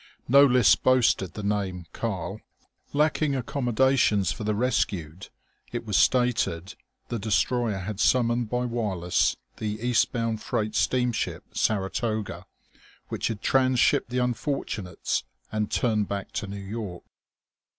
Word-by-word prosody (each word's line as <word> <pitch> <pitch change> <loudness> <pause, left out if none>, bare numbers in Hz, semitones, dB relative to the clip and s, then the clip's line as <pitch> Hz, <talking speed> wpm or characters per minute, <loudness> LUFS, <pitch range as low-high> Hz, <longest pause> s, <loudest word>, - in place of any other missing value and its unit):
No 140 +3 +7
list 125 -4 +5
boasted 120 -9 +2
the 105 - -5
name 100 -4 -2
"Karl." - - -4 0.5
Lacking 150 -1 +1
accommodations 125 - +2
for 115 - -5
the 105 0 0
rescued, 95 -8 -1 0.4
it 120 -1 -4
was 105 -3 -2
stated, 120 -8 +2 0.4
the 120 - -2
destroyer 110 +1 +1
had 95 +2 -5
summoned 120 -1 +2
by 125 +1 -1
wireless 100 -8 0 0.2
the 105 0 -3
east 120 0 +2
bound 115 -2 -2
freight 110 0 -2
steamship 125 -2 0
Saratoga, 105 -2 -1 0.6
which - - -2
had 110 -3 -5
trans 130 -2 +3
shipped - - +3
the 125 - -3
unfortunates 125 - -2 0.3
and 110 -1 -1
turned 110 -4 +1
back 100 -1 -4
to 100 - -4
New 100 +1 -6
York.... 100 -2 -6
110 Hz, 130 wpm, -26 LUFS, 100-125 Hz, 0.6 s, No